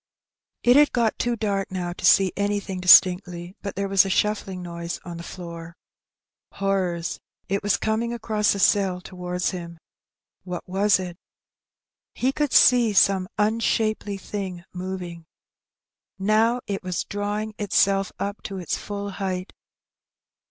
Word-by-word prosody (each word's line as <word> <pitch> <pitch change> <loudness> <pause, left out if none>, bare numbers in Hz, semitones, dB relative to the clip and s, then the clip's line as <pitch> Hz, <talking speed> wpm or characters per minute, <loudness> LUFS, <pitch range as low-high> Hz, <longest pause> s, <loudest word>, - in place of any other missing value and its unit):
It 245 +2 +6
had 295 0 +5
got 235 -3 +1
too 240 0 0
dark 200 -3 -2
now 180 -2 -3
to - - -5
see 190 -2 +5
anything 200 -2 -2
distinctly; 180 0 +5
but 200 - -5
there 200 +1 -2
was 195 -1 +5
a 195 - -4
shuiBling 200 -1 0
noise 170 0 -5
on 175 -1 -7
the - - -7
floor. 170 -1 -9 0.8
Horrors! 185 -4 -1 0.3
it 195 +1 -1
was 205 -1 +1
coming 220 +2 -1
across 220 -3 0
the - - -4
cell 190 -2 +2
towards 180 -1 -3
him. 170 -2 -7 0.7
What 180 -1 -6
was 195 +1 +3
it? 180 -2 -6 1.0
He 255 +2 +1
could 295 -1 -1
see 240 -4 +5
some 190 -2 +4
unshapely 215 -1 0
thing 190 -3 -6
moving. 180 -2 -6 0.9
Now 220 +5 +2
it 195 -1 -3
was 180 -2 -3
drawing 205 +1 -3
itself 195 -1 +2
up 200 +1 -4
to 195 - -5
its 180 -3 -2
full 200 0 -5
height. 185 -1 -4
195 Hz, 140 wpm, -24 LUFS, 180-210 Hz, 1.0 s, It